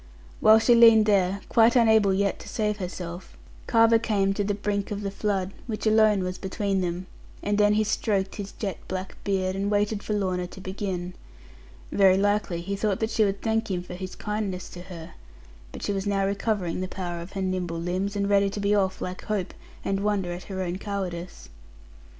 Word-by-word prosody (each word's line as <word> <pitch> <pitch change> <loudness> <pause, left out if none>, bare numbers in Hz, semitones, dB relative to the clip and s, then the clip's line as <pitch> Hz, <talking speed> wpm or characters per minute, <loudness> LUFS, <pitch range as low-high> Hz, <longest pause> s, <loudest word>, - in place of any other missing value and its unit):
While 220 0 +7
she 225 +2 +4
leaned 230 -2 +7
there, 195 -2 +2
quite 230 +1 +4
unable 220 -4 +5
yet 200 +1 0
to - - -10
save 210 -2 -1
herself, 180 -2 -7 0.3
Carver 230 0 +5
came 200 -4 +1
to 205 - -1
the 205 0 -1
brink 200 -1 -2
of 205 0 -4
the 200 - -2
flood, 195 -2 -1 0.2
which 220 -2 -4
alone 215 -2 +4
was 180 0 -4
between 195 0 -1
them; 175 +1 -3 0.4
and 205 0 0
then 210 0 +4
he 215 - +3
stroked 200 -2 -1
his 200 -1 -5
jet 200 -4 -4
black 185 0 -5
beard, 190 -2 0
and 200 +1 -1
waited 205 0 +1
for 210 - -3
Lorna 185 -3 -1
to 190 - -12
begin. 185 -2 -4 0.8
Very 190 -2 +5
likely, 205 -3 +1
he 200 +3 -3
thought 200 -1 0
that 220 0 -1
she 215 - +3
would 195 -1 -1
thank 225 0 0
him 180 -2 -2
for 180 - -9
his 185 +1 -6
kindness 210 -3 -3
to 175 - -9
her. 165 -3 -9 0.6
But - - -9
she 205 - -1
was 195 +1 -2
now 195 -1 +1
recovering 195 -3 -1
the 185 - -2
power 175 -2 -5
of 175 +3 -10
her 195 - -3
nimble 180 -3 -2
limbs; 185 +4 -2
and 200 -1 0
ready 200 0 +3
to 200 - -5
be 200 0 +1
off 190 -2 +1
like 185 0 -5
hope, 210 -4 -2 0.3
and 195 0 0
wonder 200 -3 0
at 175 - -8
her 190 -1 -4
own 180 +1 -3
cowardice. 185 -4 -5
200 Hz, 205 wpm, -26 LUFS, 185-210 Hz, 0.8 s, While